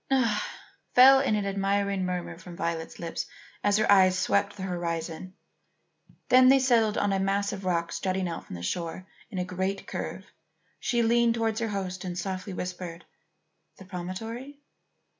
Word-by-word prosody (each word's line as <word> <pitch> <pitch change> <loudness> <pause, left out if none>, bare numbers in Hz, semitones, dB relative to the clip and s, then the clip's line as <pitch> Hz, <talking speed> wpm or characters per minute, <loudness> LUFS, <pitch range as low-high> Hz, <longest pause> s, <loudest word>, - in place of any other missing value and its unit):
"Ah!" 235 -6 +2 0.5
fell 265 +2 +9
in 265 -5 +2
an 205 -1 -1
admiring 195 0 0
murmur 180 -2 -3
from 175 0 -11
Violet's 170 -3 -3
lips 170 -1 -4 0.4
as 205 0 +3
her 215 - +3
eyes 185 -2 +6
swept 200 +2 +1
the 190 - -5
horizon. 175 0 -4 0.9
Then 255 0 +7
as - - +8
they 270 - +7
settled 235 -5 +3
on 205 -1 +1
a 195 - +1
mass 200 +1 0
of 195 -1 -7
rock 170 -2 0
jutting 185 -1 0
out 170 - -6
from - - -7
the 85 - -7
shore 170 - -3 0.2
in 200 - -7
a 180 - -1
great 190 +2 -2
curve, - - -5 0.5
she 240 -1 +1
leaned 235 0 +3
towards 225 -1 0
her 230 - -1
host 190 -3 -4
and 180 -1 -4
softly 185 +1 -4
whispered: 180 -2 -6 0.7
"The 190 - -12
promontory?" 225 +9 -6
195 Hz, 170 wpm, -28 LUFS, 180-220 Hz, 0.9 s, fell